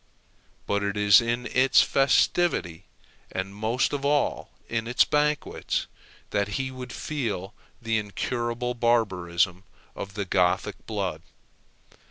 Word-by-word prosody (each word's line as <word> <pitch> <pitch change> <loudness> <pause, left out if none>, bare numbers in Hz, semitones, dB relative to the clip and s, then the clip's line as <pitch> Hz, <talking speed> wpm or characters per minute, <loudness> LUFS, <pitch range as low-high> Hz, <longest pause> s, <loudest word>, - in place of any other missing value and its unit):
But 100 0 0
it 100 0 -2
is 105 +1 +7
in 120 +1 -2
its 130 +2 +4
festivity, 135 - +2 0.5
and 95 +1 -4
most 110 +7 0
of 140 -1 -2
all 145 0 +1 0.2
in 115 0 -2
its 125 - +4
banquets, 150 0 0 0.5
that 100 -1 +1
he 130 -1 -2
would 130 -1 -8
feel 110 -10 -3 0.3
the 115 -2 0
incurable 120 +4 -2
barbarism 95 -6 +1 0.3
of 100 0 -7
the 100 -1 -2
Gothic 90 -1 0
blood. - - -3
115 Hz, 120 wpm, -26 LUFS, 100-125 Hz, 0.5 s, is